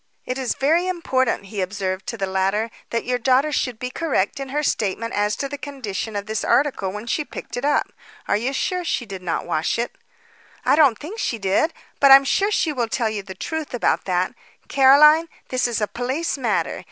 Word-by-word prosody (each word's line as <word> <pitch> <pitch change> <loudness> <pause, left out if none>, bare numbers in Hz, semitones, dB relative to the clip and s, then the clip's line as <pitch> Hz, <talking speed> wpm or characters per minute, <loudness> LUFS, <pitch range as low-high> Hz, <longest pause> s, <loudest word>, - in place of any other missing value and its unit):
"It 255 +1 -3
is 255 -2 -1
very 325 +6 +2
important," 260 - 0
he 195 0 -4
observed 185 0 -3
to 230 - -4
the 195 - -1
latter, 195 +4 0 0.2
"that 230 - -2
your 250 0 0
daughter 265 +5 +3
should 250 -5 -1
be 250 +2 -5
correct 275 - -1
in 270 -1 -5
her 295 +3 -1
statement 225 -2 -1
as 210 0 +1
to 275 - -3
the 285 0 -7
condition 225 -7 -5
of 200 0 -3
this 215 0 -2
article 265 -9 +1
when 210 +3 -7
she 300 +6 -1
picked - - -8
it 245 - -4
up. 290 +1 +1 0.3
Are - - +2
you 235 +6 -1
sure 360 +6 -1
she 270 -7 -1
did 195 -3 -8
not 175 -2 -2
wash 165 +2 0
it?" 235 +1 -3 0.7
"I - - +5
don't 285 -7 +5
think 380 - -8
she 235 - -1
did. 200 - +1 0.3
But 280 - +6
I'm 270 0 +10
sure 400 +8 +2
she 330 -7 +1
will 240 -4 -1
tell 225 -2 0
you 210 -2 -3
the 190 -1 -10
truth 315 - -4
about 245 - +1
that. 185 +1 0 0.3
Caroline, 300 +4 +6 0.2
this 255 -1 +1
is 235 -2 -1
a 210 - 0
police 260 +9 -2
matter. 245 -6 -1
245 Hz, 215 wpm, -22 LUFS, 205-285 Hz, 0.7 s, I'm